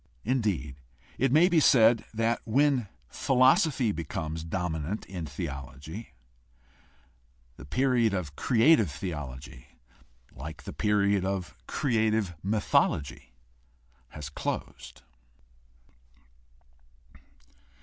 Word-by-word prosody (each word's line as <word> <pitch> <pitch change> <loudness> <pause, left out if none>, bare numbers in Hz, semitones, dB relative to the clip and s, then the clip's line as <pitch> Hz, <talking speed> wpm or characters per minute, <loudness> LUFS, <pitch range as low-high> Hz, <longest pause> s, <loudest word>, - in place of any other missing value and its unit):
Indeed, 105 - -1 0.4
it 130 0 +2
may 160 +5 +6
be 175 -3 +3
said 115 -5 +5
that 115 +1 0
when 130 0 +2 0.2
philosophy 130 - +3
becomes 80 -2 -4
dominant 85 +2 -3
in 90 -4 -6
theology 70 - -7 1.4
the - - -12
period 120 - +2
of 90 -8 -4
creative 115 - +4
theology, 70 -6 -7 0.5
like 75 +4 -9
the - - -7
period 100 -2 +2
of 95 -4 -3
creative 110 -6 0
mythology, 70 - 0 0.7
has 75 +2 -8
closed. - - -5
100 Hz, 85 wpm, -28 LUFS, 75-115 Hz, 1.4 s, may